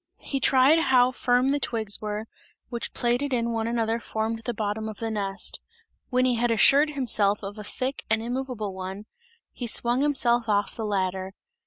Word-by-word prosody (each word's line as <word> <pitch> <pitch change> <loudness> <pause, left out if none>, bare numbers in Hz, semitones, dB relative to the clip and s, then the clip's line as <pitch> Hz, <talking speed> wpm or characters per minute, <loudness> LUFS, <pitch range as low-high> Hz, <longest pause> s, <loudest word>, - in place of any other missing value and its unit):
He 275 - -2
tried 270 +5 +5
how 255 -4 +4
firm 250 0 +1
the 285 +1 +1
twigs 220 -5 -2
were, 210 0 -4 0.4
which 235 -1 -4
plaited 245 +3 0
in 235 -1 -1
one 225 0 -1
another 230 -1 0
formed 225 0 -3
the 240 - -1
bottom 215 +1 -2
of 215 - -8
the 225 -1 -3
nest; 195 -2 -1 0.5
when 255 0 +2
he 255 - +3
had 240 +1 +1
assured 275 +7 +5
himself 215 -8 +1
of 200 +2 -7
a - - -6
thick 260 +6 -4
and 220 0 +3
immoveable 240 -3 -4
one, 190 +2 -6 0.5
he 245 - -6
swung 240 +3 +1
himself 245 -5 +2
off 205 -1 +1
of - - -12
the 220 - -3
ladder. 190 -1 -2
230 Hz, 185 wpm, -26 LUFS, 210-255 Hz, 0.5 s, tried